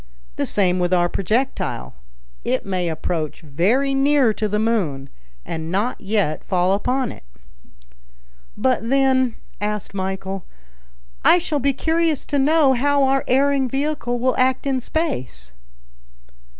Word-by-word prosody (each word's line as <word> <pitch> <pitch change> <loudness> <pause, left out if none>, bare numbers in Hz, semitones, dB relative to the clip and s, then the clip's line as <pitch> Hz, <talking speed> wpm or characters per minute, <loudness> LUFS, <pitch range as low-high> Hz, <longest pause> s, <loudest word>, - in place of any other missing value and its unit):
The - - -1
same 185 -3 +1
with 180 +1 +2
our 175 -1 +3
projectile. 195 - -2 0.5
It - - -1
may 185 -3 -1
approach 160 -1 -3
very 195 - +1
near 270 -4 +3
to 215 - -2
the 210 +1 -1
moon, 185 -12 -1 0.4
and 160 0 -5
not 210 +7 -1
yet 200 -6 0
fall 185 -1 +1
upon 250 +5 0
it." - - -12 1.4
"But 250 -3 0
then," 260 -2 +2 0.3
asked 210 -1 -3
Michel, 190 0 -4 0.8
"I - - +7
shall 330 -4 -1
be 280 +1 +1
curious 320 +1 0
to 285 - 0
know 290 -1 +4
how 280 +2 +2
our 270 0 +2
erring 275 0 +2
vehicle 270 -2 -1
will 255 +1 +1
act 260 +1 +2
in 265 -2 0
space?" 125 - -3
235 Hz, 135 wpm, -21 LUFS, 185-270 Hz, 1.4 s, I